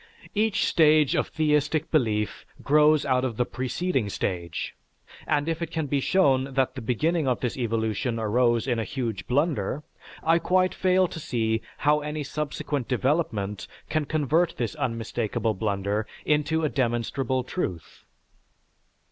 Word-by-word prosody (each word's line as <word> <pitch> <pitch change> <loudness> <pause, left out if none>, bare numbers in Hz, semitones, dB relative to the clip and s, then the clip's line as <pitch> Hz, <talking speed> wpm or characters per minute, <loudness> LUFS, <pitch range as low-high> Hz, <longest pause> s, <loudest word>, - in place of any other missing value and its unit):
Each 215 0 +1
stage 155 -3 +4
of - - +1
theistic 155 0 +1
belief 110 -8 0 0.2
grows 150 +1 +4
out 130 -1 +2
of 120 -4 -2
the 125 - +2
proceeding 130 - -2
stage, 90 -3 -3 0.5
and 150 0 +1
if 165 0 -2
it 165 - -2
can 160 -2 -2
be 140 0 0
shown 135 -5 +2
that 135 -1 +2
the - - -6
beginning 150 +7 0
of 125 -2 +1
this 125 - -1
evolution 115 0 -1
arose 120 +2 +2
in 120 -3 +1
a - - 0
huge 120 -6 -4
blunder, 140 - 0 0.4
I 165 +1 +4
quite 185 +1 +2
fail 185 0 +3
to 165 - -7
see 115 -5 -1 0.2
how 150 0 +3
any 150 0 -4
subsequent 145 -2 -3
development 125 - -1 0.2
can 155 -1 +1
convert 155 +3 +1
this 120 +2 -2
unmistakable 115 -5 -2
blunder 100 +1 -1 0.2
into 150 +2 +1
a 155 - +2
demonstrable 130 +1 -1
truth." 95 - -5
135 Hz, 145 wpm, -26 LUFS, 115-155 Hz, 0.5 s, stage